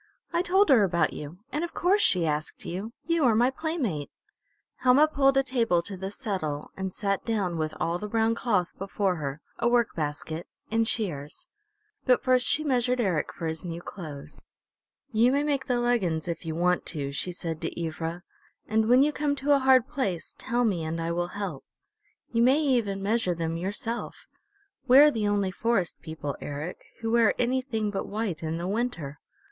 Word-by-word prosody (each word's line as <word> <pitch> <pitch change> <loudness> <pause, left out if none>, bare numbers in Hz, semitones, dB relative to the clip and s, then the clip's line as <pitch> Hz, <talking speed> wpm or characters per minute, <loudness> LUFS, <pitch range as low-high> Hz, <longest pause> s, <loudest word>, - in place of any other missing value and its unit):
"I 340 - +3
told 380 +1 +3
her 250 -7 +6
about 175 -3 +1
you. 150 +6 -8
And 300 - -1
of 345 - -5
course 390 +4 +3
she 180 -3 +4
asked 150 0 -3
you. 195 +6 -4
You 335 -1 +1
are 230 -3 +4
my 245 +4 +4
playmate!" 265 - -2 0.7
Helma 260 +4 +5
pulled 275 -3 +3
a 270 - +5
table 230 -10 +1
to 200 +2 -5
the 190 +1 -5
settle 185 - -4
and 190 0 -3
sat 200 0 -1
down 200 -7 -1
with 155 0 -2
all 170 +1 0
the 210 - -4
brown 225 +1 +2
cloth 205 -7 0
before 195 -1 -1
her, 145 0 -4 0.2
a 235 - +2
work 240 -2 +2
basket, 155 +2 -4 0.2
and 225 0 +2
shears. 150 -12 -2 0.6
But 250 - +4
first 255 -2 +3
she 310 - +1
measured 250 -3 +1
Eric 185 -9 0
for 170 - -7
his 160 0 -3
new 170 -1 -5
clothes. 155 -6 -8 0.7
"You 230 +2 +4
may 285 +2 +2
make 285 -2 -1
the 250 -2 +1
leggins, 190 -10 +1
if 170 -1 -4
you 160 - -2
want 180 +1 +2
to," 140 -4 -4
she 160 +6 -1
said 165 -2 -5
to - - -4
Ivra, 165 +2 -4 0.4
"and 220 +1 +2
when 250 +2 +7
you 300 +1 +2
come 290 -1 0
to 285 +1 +2
a - - +3
hard 260 -2 +5
place 200 - -3
tell 245 -1 0
me 185 -7 0
and 160 +1 -3
I 165 0 -1
will 175 +1 -1
help. 185 -9 -4 0.7
You 230 - +2
may 260 +4 +5
even 235 -10 +1
measure 205 -4 +1
them 165 0 -2
yourself.... 225 +7 -4 0.6
We're 280 +4 +8
the 220 -4 -1
only 200 -2 +1
Forest 200 -3 0
People, 150 -3 -5
Eric, 145 +5 -5 0.2
who 225 -1 -1
wear 230 -2 +4
anything 245 -4 0
but 195 - -3
white 205 -5 -3
in 160 0 -2
the 175 +1 -3
winter. 195 - -2
205 Hz, 190 wpm, -27 LUFS, 170-250 Hz, 0.7 s, We're